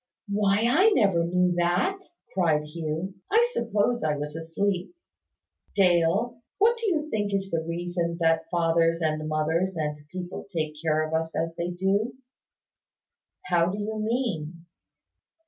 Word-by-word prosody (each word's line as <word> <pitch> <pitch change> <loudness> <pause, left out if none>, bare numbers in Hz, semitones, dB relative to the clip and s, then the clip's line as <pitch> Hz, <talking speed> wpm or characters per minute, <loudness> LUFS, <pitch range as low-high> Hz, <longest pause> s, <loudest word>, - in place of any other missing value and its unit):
"Why, 205 +1 +2
I 360 - +5
never 185 -5 +3
knew 180 0 +2
that!" 175 - +1 0.3
cried 160 -5 +2
Hugh. 160 +4 -4 0.2
"I 460 +3 +4
suppose 230 +1 0
I 150 -1 +1
was 150 +1 -5
asleep. 180 - -2 0.8
Dale, 195 +6 +2 0.2
what 450 +4 +4
do 460 -1 -2
you 310 -5 0
think 205 -2 0
is 195 0 -2
the 165 -1 0
reason 170 +1 -2
that 165 -1 +3
our 160 - -19
fathers 165 -1 +2
and 155 -1 -1
mothers 160 +5 0
and 150 -1 -3
people 180 +3 -6
take 155 -4 -2
care 155 -1 +1
of 155 - -7
us 160 0 -1
as 165 0 -1
they 170 +1 -2
do?" 195 +6 0 1.3
"How 170 -1 +3
do 195 - -3
you 215 +1 -3
mean?" 195 - -2
175 Hz, 145 wpm, -26 LUFS, 165-205 Hz, 1.3 s, I